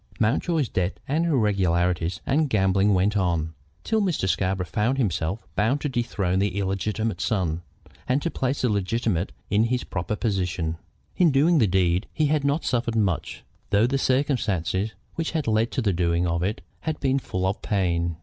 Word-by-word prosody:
Mountjoy's 140 +6 +1
debts, 90 -1 -1
and 160 +5 +1
irregularities, 90 - +1
and 150 +2 +2
gambling 95 -2 +3
went 100 +3 +2
on, 85 -5 0 0.3
till 220 -1 +1
Mr. 175 - 0
Scarborough 95 +1 0
found 105 - 0
himself 95 - -1
bound 115 +9 +2
to 145 - -1
dethrone 105 -7 -1
the 100 -1 0
illegitimate 100 +1 -1
son, 85 -6 0 0.5
and 125 +2 +2
to 170 - -1
place 135 +1 -1
the 125 - +3
legitimate 105 -2 0 0.2
in 105 +2 +4
his 125 +1 0
proper 90 +3 -3
position. 90 -7 -1 0.4
In 175 -3 +5
doing 155 +4 +4
the 110 - +4
deed 90 -1 +1
he 155 - +2
had 150 0 +1
not 140 +3 0
suffered 120 -1 0
much, 100 -7 -1 0.3
though 100 +3 +4
the 135 +3 0
circumstances 110 - 0 0.2
which 165 -1 -3
had 160 -3 -1
led 110 +1 +2
to 130 - 0
the 100 -3 +2
doing 85 0 +1
of 85 0 0
it 100 +4 -2 0.2
had 160 - -3
been 135 0 +1
full 95 -7 -3
of 95 +2 -1
pain. 85 -4 0
105 Hz, 175 wpm, -25 LUFS, 90-130 Hz, 0.5 s, In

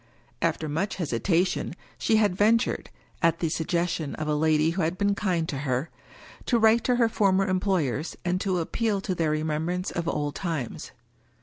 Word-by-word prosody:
After 155 - 0
much 165 +7 -1
hesitation 175 +3 0 0.2
she 220 - +2
had 210 -4 +3
ven 215 +4 +5
tured 230 - -3 0.2
— - - -33
at 165 -1 +3
the 165 - -1
suggestion 170 -1 -1
of 155 - -4
a 150 - +1
lady 155 +1 +3
who 185 +3 -2
had 165 +3 0
been 200 +1 +2
kind 180 -5 0
to 140 - -3
her 135 +2 -2 0.3
— - - -19
^to 240 - +3
write 225 +1 +5
to 250 - +3
her 240 -1 +4
former 195 -3 +2
employers, 180 -6 0
and 180 +1 0
to 190 -2 0
appeal 205 +5 0
to 190 - -2
their 165 -3 0
remembrance 160 +4 -1
of 170 -1 -3
old 145 -3 -1
times. 155 -5 -4
175 Hz, 190 wpm, -26 LUFS, 155-195 Hz, 0.3 s, ven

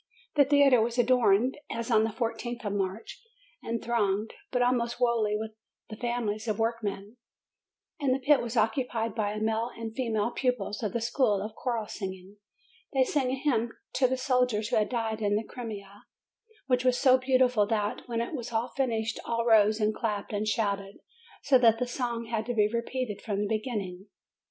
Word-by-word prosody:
The 285 -2 +6
theatre 280 -4 +5
was 235 +2 -1
adorned 245 0 +3
as 230 +1 -4
on 220 -1 +5
the - - -1
I4th 235 +1 -4
of 205 - -1
March, 200 - -3 0.4
and 230 0 -3
thronged, 215 -2 0 0.2
but 250 -1 +1
almost 240 -1 +1
wholly 230 -4 +1
with 220 0 -5 0.4
the - - -5
families 235 -2 -2
of 215 -2 0
workmen; 225 -1 -2 0.8
and 280 -3 +1
the 255 - +3
pit 275 +2 +3
was 235 0 -4
occupied 230 -2 0
by 210 -1 -1
the 215 - -2
male 225 +2 0
and 225 -1 -6
female 230 -3 0
pupils 245 -5 -1
of 210 -4 -2
the 235 - -1
school 230 -3 +2
of 210 +2 -5
choral 235 -2 -2
singing. 190 -1 -7 0.6
They 265 - +5
sang 260 0 0
a 260 - 0
hymn 240 -5 0 0.2
to 255 0 +3
the 260 +1 -1
soldiers 250 -5 +1
who - - +2
had 210 -1 +1
died 225 -3 -2
in 205 -1 +2
the 215 - 0
Crimea, 205 -4 -8 0.6
which 250 -2 +1
was 255 -1 +3
so 260 -1 +5
beautiful 255 -5 +3
that, 210 -2 -1
when 230 -1 -1
it 235 - -4
was 245 -5 -5 0.2
finished, 230 -4 -1
all 230 0 -1
rose 215 -1 +5
and 215 0 +2
clapped 210 -2 -3
and 210 +1 -1
shouted, 200 -2 -1 0.5
so 265 -2 +5
that 230 -2 +5
the 250 - -1
song 240 -2 -3
had 225 -1 -3
to 245 - -2
be 210 -2 +4
repeated 235 -1 -3
from 205 -3 -2
the 205 - 0
beginning. 210 -4 -3
230 Hz, 185 wpm, -28 LUFS, 210-250 Hz, 0.8 s, The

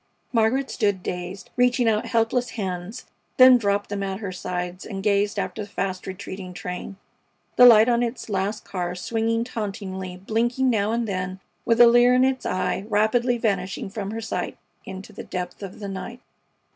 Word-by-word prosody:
Margaret 240 +4 +2
stood 205 -5 0
dazed, 180 +2 -6
reaching 250 -1 +3
out 220 +1 +1
helpless 230 +1 +1
hands, 190 +3 -4 0.3
then 255 -1 +8
dropped 200 -1 0
them 200 -1 -2
at 195 -1 -2
her 200 -4 -4
sides 180 0 -4
and 195 -3 -6
gazed 205 +1 +1
after 200 - -3
the 205 - -7
fast 190 -2 -3
retreating 190 -1 -7
train, 180 +2 -6 0.6
the 250 - +9
light 225 -1 +8
on 240 -1 +3
its 240 +1 -3
last 200 +1 -2
car 180 -2 -3
swinging 225 +4 -1
tauntingly, 195 -5 -5
blinking 240 +6 0
now 210 -1 +1
and 230 0 -1
then 185 -1 -3 0.3
with 230 0 +2
a 240 - +10
leer 240 +1 +6
in 255 - +4
its 260 0 0
eye, 185 +1 -1
rapidly 235 +4 +2
vanishing 195 -4 -2
from 200 -1 -4
her 225 +2 -4
sight 220 -5 -4 0.3
into 190 0 -9
the - - -8
depth 180 +1 -5
of 195 -2 -8
the 205 - -5
night. 200 +5 -6
205 Hz, 175 wpm, -24 LUFS, 190-235 Hz, 0.6 s, a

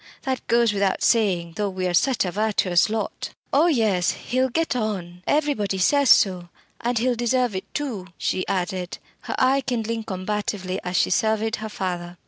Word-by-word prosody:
"That 260 -1 -3
goes 235 -2 +3
without 195 -1 0
saying 185 -7 +2
though 205 -1 0
we 185 -1 -3
are 180 - 0
such 250 +5 +2
a 180 - -2
virtuous 200 -3 +2
lot." 220 0 -4 0.2
"Oh 300 +5 +5
yes, 215 - +2
he'll 255 +2 -1
get 325 +2 -1
on 190 -7 -3
everybody 285 -10 +1
says 280 +8 +3
so. 180 -3 +4 0.3
And 240 +1 -1
he'll 250 +2 +2
deserve 240 -1 0
it 190 - -6
too!" 240 -11 -3
she 185 - -1
added, 180 -1 -2 0.3
her - - -3
eye 265 +2 +3
kindling 230 -3 -2
combatively 190 -1 -3
as 180 0 -2
she - - +2
surveyed 220 +2 +1
her 220 0 -6
father. 180 -3 -4
210 Hz, 170 wpm, -23 LUFS, 185-240 Hz, 0.3 s, Oh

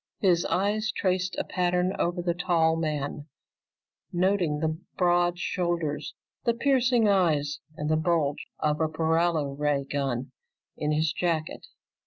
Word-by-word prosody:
His 175 -4 +3
eyes 210 +3 0
traced 185 -1 0
a - - 0
pattern 180 +1 0
over 175 +1 0
the 175 -1 +1
tall 170 -2 +2
man, 150 -2 -3 0.8
noting 180 -4 +1
the 160 +1 -1 0.2
broad 175 -1 +3
shoulders, 170 -5 -2 0.3
the 235 - +1
piercing 250 -3 +3
eyes, 160 -7 +2 0.2
and 150 - -3
the 155 0 +2
bulge 155 -3 0
of 150 0 0
a 160 - +3
paralo 160 -2 +1
ray 145 -1 0
gun 135 -2 -2 0.4
in 150 0 -1
his 155 0 +1
jacket. 165 -3 -2
170 Hz, 135 wpm, -27 LUFS, 150-180 Hz, 0.8 s, His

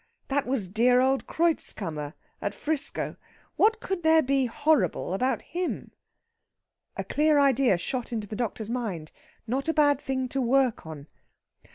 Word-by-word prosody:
That 280 -1 0
was 250 -7 -1
dear 240 +6 +3
old 265 +1 +1
Kreutzkammer, 160 - -2 0.3
at 205 0 -3
'Frisco. 300 +3 -2 0.4
What 445 +1 +3
could 385 -5 -3
there 320 0 +5
be 270 -1 +1
horrible 230 - +1
about 255 +7 0
him?..." 355 +1 -4 1.1
A - - -2
clear 300 0 +2
idea 270 -7 +4
shot 245 +8 -4
into 220 -3 -3
the 215 - -6
doctor's 225 -1 -3
mind 200 -11 -4 0.3
not 265 +6 -2
a 325 - 0
bad 290 -2 +4
thing 260 -1 -2
to 270 - -1
work 250 -6 +1
on. 150 -3 -8
260 Hz, 150 wpm, -27 LUFS, 220-290 Hz, 1.1 s, there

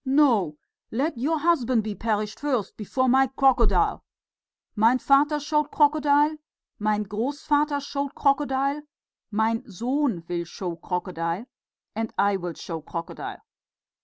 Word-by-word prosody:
"No! 255 - +3 0.3
let 280 +7 -1
your 290 +7 0
husband 260 -8 +2
be 215 -1 -3
perished 210 -1 -2
first, 255 -9 -1
before 255 +5 -1
my 265 +2 +5
crocodile!... 245 -8 +2 0.7
Mein 225 +4 +4
Vater 290 +3 +3
showed 300 0 0
crocodile, 295 0 +3 0.4
mein 210 0 +1
Grossvater 285 +7 0
showed 280 0 -4
crocodile, 275 0 +1 0.5
mein 225 +3 0
Sohn 240 - -1
will 170 -1 -2
show 175 0 -5
crocodile, 175 +2 -3 0.5
and 225 0 -2
I 200 0 +3
will 175 -2 -5
show 165 0 -6
crocodile! 165 +2 -6
250 Hz, 120 wpm, -25 LUFS, 205-285 Hz, 0.7 s, my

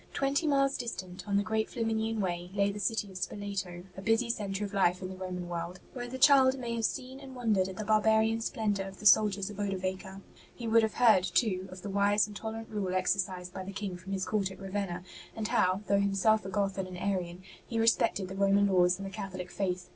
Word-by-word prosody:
Twenty 280 +4 +1
miles 275 -1 +2
distant, 185 -6 -6
on 200 -1 +2
the 200 - +2
great 220 +1 -1
Flaminian 225 -2 -1
Way, 175 -2 -2
lay 200 0 +2
the 205 - -7
city 205 0 -1
of 185 - -7
Spoleto, 190 -3 -4
a 190 - -7
busy 225 +3 +2
centre 205 -2 -3
of 200 - -8
life 180 -2 +2
in 185 - -4
the 190 - -7
Roman 180 -1 -5
world, 175 +1 -5
where 245 -2 -5
the 255 +2 -6
child 265 -1 +6
may 240 -2 -4
have 230 -1 0
seen 260 +4 -3
and 270 -2 -10
wondered 215 -6 +1
at 190 - -7
the 215 - -4
barbarian 220 +1 +3
splendour 205 -4 -1
of 195 0 -11
the 210 - -10
soldiers 205 -1 +5
of 205 - -10
Odovaker. 190 -1 -3 0.3
He 235 - -6
would 225 +1 +5
have 220 -1 -1
heard, 225 -7 +5
too, 190 -4 0
of 185 0 -10
the 205 - -4
wise 205 +1 +3
and 210 -1 -10
tolerant 225 +1 -6
rule 195 -4 -2
exercised 185 -1 -1
by 190 - -5
the 195 - -7
King 195 -2 -4
from 180 +2 -9
his 190 -1 -1
court 205 -3 0
at 190 - -11
Ravenna, 190 -2 -3 0.3
and 220 -1 -3
how, 185 +2 +2
though 200 0 +3
himself 200 +1 +2
a - - -4
Goth 195 0 -1
and 190 - -2
an 180 -1 -8
Arian, 180 -2 -2 0.2
he 230 - -3
respected 225 -3 +2
the 190 - -7
Roman 200 +1 +4
laws 180 -2 +3
and 195 - -6
the 195 - -6
Catholic 190 -3 -6
faith. 180 -2 -2
200 Hz, 230 wpm, -30 LUFS, 185-220 Hz, 0.3 s, child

